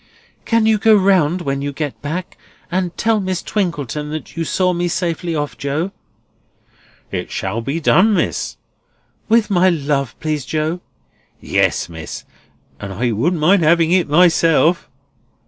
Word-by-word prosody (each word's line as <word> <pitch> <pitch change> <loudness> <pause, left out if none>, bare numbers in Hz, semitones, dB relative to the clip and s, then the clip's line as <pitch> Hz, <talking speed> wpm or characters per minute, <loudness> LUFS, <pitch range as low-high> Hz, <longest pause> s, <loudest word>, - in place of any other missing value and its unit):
"Can 230 -1 +2
you 220 -1 +3
go 220 +1 +5
round 185 -4 +3
when 140 -2 -2
you 145 0 -3
get 145 0 -5
back, 165 +5 -5 0.4
and 180 -1 -2
tell 225 -1 +2
Miss 185 -3 -3
Twinkleton 150 - -2
that 155 +1 -7
you 165 - -2
saw 180 +3 +1
me 175 0 -1
safely 170 -1 -2
off, 145 -1 -3
Joe?" 150 +7 -2 1.2
"It - - -4
shall 105 +5 -3
be 140 +7 -3
done, 200 +6 +4
Miss." - - -2 0.7
"With 225 -2 +3
my 185 0 +4
love, 140 -5 -1
please, 155 -2 -2
Joe." 155 +5 -2 0.6
"Yes, - - 0
Miss—and 85 +4 -11
I 120 +5 -1
wouldn't 155 - 0
mind 180 +5 +4
having 165 +1 +3
it 180 -4 +2
myself!" 165 0 +3
165 Hz, 145 wpm, -18 LUFS, 145-185 Hz, 1.2 s, go